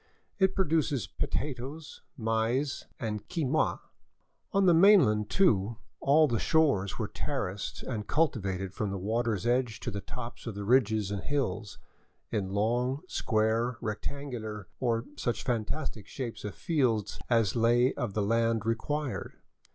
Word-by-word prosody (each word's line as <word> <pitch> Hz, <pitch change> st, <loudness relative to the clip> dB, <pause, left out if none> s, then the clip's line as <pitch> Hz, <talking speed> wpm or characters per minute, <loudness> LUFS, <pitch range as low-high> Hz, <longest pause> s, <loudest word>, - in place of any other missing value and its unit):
It 190 Hz, -1 st, +3 dB
pro 190 Hz, -, +2 dB
duces 150 Hz, -, +1 dB
potatoes, 145 Hz, +3 st, -4 dB, 0.2 s
maize, 115 Hz, +4 st, 0 dB
and 105 Hz, -5 st, -4 dB
quinoa. 155 Hz, -3 st, +1 dB, 0.7 s
On 195 Hz, -2 st, +3 dB
the 175 Hz, -, +6 dB
mainland, 165 Hz, -, +6 dB
too, 115 Hz, -, +3 dB, 0.2 s
all 155 Hz, +3 st, +5 dB
the 115 Hz, -5 st, 0 dB
shores 140 Hz, -12 st, +2 dB
were 110 Hz, -, -2 dB
terraced 100 Hz, -7 st, -4 dB
and 110 Hz, -5 st, -4 dB
cultivated 95 Hz, -, 0 dB
from 105 Hz, 0 st, -2 dB
the 100 Hz, -, -3 dB
water's 110 Hz, +1 st, -1 dB
edge 120 Hz, -2 st, +1 dB
to 120 Hz, -, -3 dB
the 100 Hz, -1 st, -4 dB
tops 120 Hz, +2 st, -8 dB
of 110 Hz, -, -4 dB
the 100 Hz, 0 st, -4 dB
ridges 110 Hz, -4 st, +3 dB
and 100 Hz, -2 st, -2 dB
hills, 110 Hz, -8 st, -2 dB, 0.5 s
in 100 Hz, -4 st, -1 dB
long, 120 Hz, +7 st, 0 dB
square, 115 Hz, 0 st, +1 dB
rectangular, 110 Hz, -3 st, -5 dB
or 115 Hz, -2 st, 0 dB
such 120 Hz, -3 st, -1 dB
fantastic 120 Hz, -1 st, -2 dB
shapes 125 Hz, -4 st, -5 dB
of 105 Hz, -, -5 dB
fields 125 Hz, -, 0 dB
as 115 Hz, -5 st, +3 dB
the -, -, -1 dB
lay 120 Hz, +3 st, +4 dB
of 115 Hz, -5 st, -3 dB
the 105 Hz, -, +1 dB
land 115 Hz, 0 st, +1 dB
required. 145 Hz, +5 st, -2 dB
115 Hz, 145 wpm, -30 LUFS, 105-140 Hz, 0.7 s, the